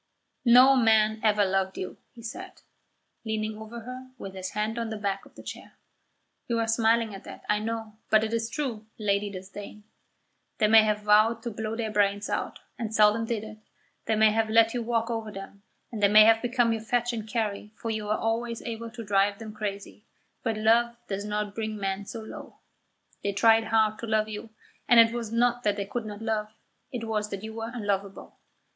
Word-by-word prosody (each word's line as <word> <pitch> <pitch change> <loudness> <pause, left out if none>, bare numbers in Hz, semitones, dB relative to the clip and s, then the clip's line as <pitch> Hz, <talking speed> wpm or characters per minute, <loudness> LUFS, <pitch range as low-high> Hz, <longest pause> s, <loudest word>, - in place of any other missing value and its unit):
"No 255 +3 +8
man 220 -3 +4
ever 210 -2 +4
loved 190 0 0
you," 185 - -5 0.2
he 230 - -14
said, 225 - -8 0.6
leaning 220 -1 -2
over 225 +2 -8
her 255 +2 -9
with 195 -4 -8
his 190 -1 -5
hand 215 +2 -2
on 230 -1 -3
the 220 - -4
back 200 -1 -3
of - - -23
the - - -12
chair. - - -9 0.7
"You 235 -2 0
are 230 0 0
smiling 225 -1 +2
at 195 - -9
that, - - -11
I 210 0 +2
know; 220 0 -5
but 215 0 +5
it 220 +1 -2
is 225 0 -1
true, 230 -5 -4
Lady 205 -1 0
Disdain. 200 +2 -9 0.7
They 215 - +3
may 220 +1 +8
have 210 0 0
vowed 215 +2 +4
to 235 - -3
blow 220 +1 -4
their 225 -2 -3
brains 205 -1 +1
out, - - -3 0.2
and 225 -2 -3
seldom 215 +1 +4
did 225 -2 -2
it; 215 0 -10 0.5
they 220 - +1
may 215 0 +5
have 220 0 +1
let 225 0 +5
you 245 - -1
walk 230 0 -1
over 225 -2 -3
them, 195 0 -10 0.3
and 220 -3 -5
they 200 - +6
may 215 +1 +8
have 225 +1 +5
become 240 -1 +2
your 225 - -3
fetch 240 +2 0
and 220 -2 -5
carry, 210 -2 -2
for 230 - -4
you 215 -1 -3
were 215 +1 0
always 230 +1 -2
able 230 0 -5
to 230 -1 -8
drive 200 0 +2
them 220 -1 -8
crazy; 205 -1 -6 0.4
but 225 -3 -1
love 235 +2 +3
does 200 0 -3
not 210 -1 -2
bring 220 -1 -3
men 195 0 -3
so 230 - -6
low. 220 - -10 0.7
They 200 - -1
tried 225 +2 +4
hard 220 -1 +2
to 230 - -5
love 215 -1 +1
you, 215 +1 -7 0.4
and 240 0 +7
it 230 0 +6
was 235 -2 -4
not 240 +1 +2
that 210 -3 +1
they 200 -1 -3
could 220 +2 -4
not 210 +1 -7
love; 215 -1 -1 0.4
it 245 -3 -4
was 215 -2 -2
that 200 0 -6
you 220 0 -6
were 225 0 -5
unlovable. 200 -4 -4
220 Hz, 210 wpm, -27 LUFS, 210-230 Hz, 0.7 s, No